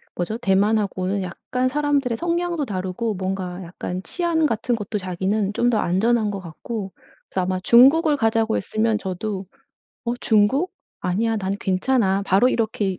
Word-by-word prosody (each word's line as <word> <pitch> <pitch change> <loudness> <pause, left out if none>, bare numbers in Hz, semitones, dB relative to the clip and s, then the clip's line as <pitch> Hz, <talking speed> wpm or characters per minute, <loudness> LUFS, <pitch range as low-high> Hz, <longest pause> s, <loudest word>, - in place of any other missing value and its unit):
뭐죠? 195 +6 -2
대만 205 0 +3
하고는 195 -1 -2
약간 250 +8 -2
사람들의 280 -4 0
성향도 340 -3 -1
다르고 190 +2 -3
뭔가 185 -1 -4
약간 180 +1 -5
치안 340 -3 0
같은 235 0 -1
것도 210 -1 -4
자기는 195 +2 -1
좀 240 - +2
더 235 - +2
안전한 215 +4 +1
것 200 - -4
같고 190 +4 -6 0.4
그래서 190 - -1
아마 185 0 -1
중국을 285 - +6
가자고 225 -2 +1
했으면 220 0 0
저도 190 0 -4 0.6
"어 235 - -1
중국? 235 - +2 0.3
아니야. 220 +5 0
난 195 -1 -2
괜찮아." 195 0 +1
바로 200 +7 +4
이렇게 215 -5 -1
215 Hz, 330 characters per minute, -22 LUFS, 190-240 Hz, 0.6 s, 중국을